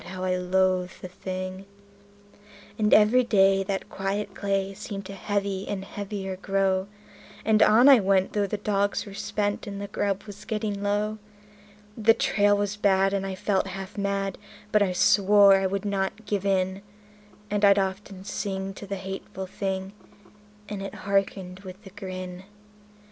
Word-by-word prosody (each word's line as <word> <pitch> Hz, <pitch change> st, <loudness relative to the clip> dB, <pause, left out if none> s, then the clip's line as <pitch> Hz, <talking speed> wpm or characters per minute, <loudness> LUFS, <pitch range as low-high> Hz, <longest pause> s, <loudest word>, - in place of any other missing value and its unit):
how 185 Hz, +1 st, -6 dB
I 185 Hz, 0 st, +1 dB
loathed 185 Hz, 0 st, +1 dB
the -, -, -4 dB
thing. 185 Hz, +1 st, -6 dB, 1.1 s
And 210 Hz, -1 st, +2 dB
every 220 Hz, +4 st, +6 dB
day 195 Hz, -4 st, +4 dB
that 195 Hz, 0 st, -3 dB
quiet 195 Hz, +1 st, -3 dB
clay 195 Hz, 0 st, -1 dB
seemed 200 Hz, -1 st, -7 dB
to 195 Hz, -, -7 dB
heavy 200 Hz, 0 st, -2 dB
and 195 Hz, -1 st, -4 dB
heavier 195 Hz, -2 st, -5 dB
grow; 195 Hz, 0 st, 0 dB, 0.6 s
And 220 Hz, -1 st, +4 dB
on 225 Hz, +6 st, +6 dB
I 275 Hz, -3 st, +9 dB
went, 190 Hz, -1 st, +2 dB
though 205 Hz, -1 st, +1 dB
the 210 Hz, -, -3 dB
dogs 205 Hz, 0 st, 0 dB
were 200 Hz, -, -10 dB
spent 205 Hz, +1 st, -2 dB
and 200 Hz, -1 st, -5 dB
the 200 Hz, -, -5 dB
grub 200 Hz, 0 st, -2 dB
was 205 Hz, -1 st, -11 dB
getting 215 Hz, -2 st, -3 dB
low; 210 Hz, +1 st, -1 dB, 0.8 s
The 225 Hz, 0 st, +4 dB
trail 205 Hz, 0 st, +3 dB
was 205 Hz, 0 st, -2 dB
bad, 195 Hz, -1 st, +3 dB
and 195 Hz, -1 st, -1 dB
I 190 Hz, -, -4 dB
felt 190 Hz, 0 st, 0 dB
half 195 Hz, +1 st, -7 dB
mad, 200 Hz, -1 st, -2 dB, 0.3 s
but 210 Hz, -, +4 dB
I 195 Hz, -2 st, +2 dB
swore 200 Hz, +2 st, +6 dB
I 195 Hz, 0 st, +1 dB
would 200 Hz, +1 st, -3 dB
not 200 Hz, +2 st, -2 dB
give 205 Hz, -1 st, -1 dB
in; 190 Hz, 0 st, 0 dB, 0.7 s
And 205 Hz, 0 st, 0 dB
I'd 200 Hz, 0 st, +7 dB
often 190 Hz, 0 st, -3 dB
sing 195 Hz, -1 st, -4 dB
to 200 Hz, -, -10 dB
the 200 Hz, -, -3 dB
hateful 190 Hz, 0 st, -6 dB
thing, 190 Hz, 0 st, -4 dB, 0.7 s
and 205 Hz, -1 st, -5 dB
it 195 Hz, -, -6 dB
hearkened 195 Hz, -2 st, -1 dB
with 190 Hz, +2 st, -11 dB
a 195 Hz, -, -11 dB
grin. 185 Hz, -2 st, -7 dB
195 Hz, 165 wpm, -26 LUFS, 190-205 Hz, 1.1 s, I